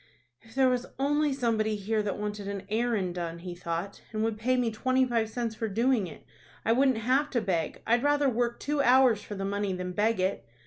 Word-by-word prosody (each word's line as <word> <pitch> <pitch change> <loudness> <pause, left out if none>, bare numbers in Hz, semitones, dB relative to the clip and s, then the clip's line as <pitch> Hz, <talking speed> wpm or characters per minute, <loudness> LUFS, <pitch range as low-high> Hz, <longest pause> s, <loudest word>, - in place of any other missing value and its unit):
"If 225 +1 -18
there 265 -1 +4
was 250 0 0
only 295 +2 +2
somebody 225 -5 0
here 215 +2 -1
that 205 -2 -2
wanted 210 -1 -4
an 200 -1 -5
errand 215 -5 0
done," 170 -1 -4
he 175 +1 -7
thought, 170 +2 -4
"and 215 -1 -1
would 220 -1 -1
pay 255 +3 +1
me 240 -2 +1
twenty 255 +4 +2
five 230 -3 0
cents 230 0 -3
for 225 +1 -3
doing 230 0 +1
it, 155 - -12 0.4
I 225 - +3
wouldn't 260 0 +3
have 260 +6 +1
to 245 - +1
beg 175 -7 -2
I'd 235 +1 +3
rather 290 0 +3
work 240 -1 0
two 295 0 0
hours 250 -4 +5
for 205 - -7
the 195 0 -3
money 200 0 -1
than 180 0 -4
beg 210 +3 +1
it." 190 +2 0
225 Hz, 220 wpm, -28 LUFS, 200-255 Hz, 0.4 s, hours